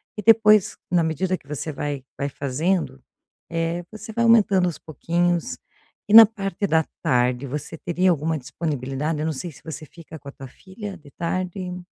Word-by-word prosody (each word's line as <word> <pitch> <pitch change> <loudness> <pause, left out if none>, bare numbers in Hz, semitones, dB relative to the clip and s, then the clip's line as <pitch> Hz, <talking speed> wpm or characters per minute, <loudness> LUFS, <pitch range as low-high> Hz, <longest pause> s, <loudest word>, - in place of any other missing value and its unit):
E 210 - -5
depois, 215 -2 +5
na 175 -1 +4
medida 170 +4 -1
que - - -14
você 150 +2 -4
vai 145 -1 -4
vai 140 - -2
fazendo, 145 - -2 0.5
eh, 165 +1 -2
você 220 +1 -9
vai 235 +1 0
aumentando 205 -5 +4
aos 170 - -4
pouquinhos. 170 +2 -1 0.5
E - - +1
na 225 0 +12
parte 200 -2 -3
da 160 -2 +3 0.2
tarde, 125 -3 +1
você 150 +4 -5
teria 180 +3 +1
alguma 160 0 -1
disponibilidade? 140 +1 -3
Eu - - -1
não 160 - -1
sei 170 +5 -6
se 140 - -18
você 160 -1 -7
fica 160 -2 -12
com 140 0 -10
a - - -8
tua 135 -1 -11
filha 195 - -9
de 145 - -17
tarde. 180 +2 -4
165 Hz, 180 wpm, -23 LUFS, 145-190 Hz, 0.5 s, na